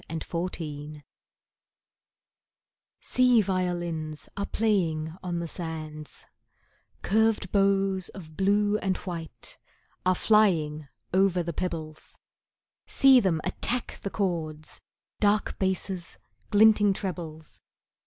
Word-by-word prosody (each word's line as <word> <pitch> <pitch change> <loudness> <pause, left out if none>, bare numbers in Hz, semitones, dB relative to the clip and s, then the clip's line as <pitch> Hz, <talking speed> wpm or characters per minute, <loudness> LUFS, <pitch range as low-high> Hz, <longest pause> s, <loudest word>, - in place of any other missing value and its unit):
[Pg 160 0 -4
129] - - -18 0.6
BLUE - - -8
WATER 145 - -18 2.0
Sea 250 -2 +4
violins 175 -5 -2
are 200 0 -3
playing 165 -8 0
on 175 -2 -3
the 170 0 -3
sands; 155 -2 -7 0.8
Curved 220 -1 +2
bows 195 -2 +2
of 155 -5 -11
blue 205 +2 +2
and 190 -1 -1
white 165 - -8 0.4
are 185 0 +3
flying 165 -9 +2 0.3
over 185 -2 +3
the 170 0 -4
pebbles, 160 -3 -5 0.7
See 270 -1 +6
them 180 -8 +1
attack 245 0 -2
the 200 - -3
chords—dark 180 +3 -2
basses, 190 -2 -2 0.3
glinting 210 -1 +5
trebles. 170 -5 -6
185 Hz, 100 wpm, -27 LUFS, 160-200 Hz, 2.0 s, See